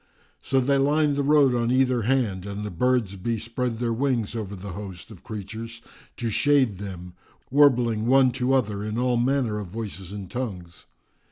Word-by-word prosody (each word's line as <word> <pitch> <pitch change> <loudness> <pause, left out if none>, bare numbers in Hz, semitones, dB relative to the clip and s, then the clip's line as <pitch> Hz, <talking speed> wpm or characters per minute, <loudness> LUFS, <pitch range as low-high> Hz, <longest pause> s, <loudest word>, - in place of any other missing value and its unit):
So 135 - +1
they 135 +2 +2
lined 145 +1 +2
the 140 - 0
road 140 -2 +4
on 120 -1 0
either 130 -1 +2
hand, 110 -6 0
and 100 +1 -5
the 105 - -5
birds 115 +1 +1
bespread 115 +4 -3
their 115 0 -1
wings 120 -4 -1
over 105 -3 -4
the 95 +1 -8
host 95 +1 -8
of 95 - -13
creatures 110 +2 -7 0.4
to 115 -2 -2
shade 130 -5 +3
them, 90 -3 -7 0.4
warbling 125 -6 +4
one 130 0 +5
to 130 +1 0
other 105 -6 0
in 105 +1 -3
all 125 0 +1
manner 120 -3 +1
of 105 - -6
voices 100 -2 -6
and 100 -2 -6
tongues. 90 -8 -6
115 Hz, 175 wpm, -25 LUFS, 100-130 Hz, 0.4 s, one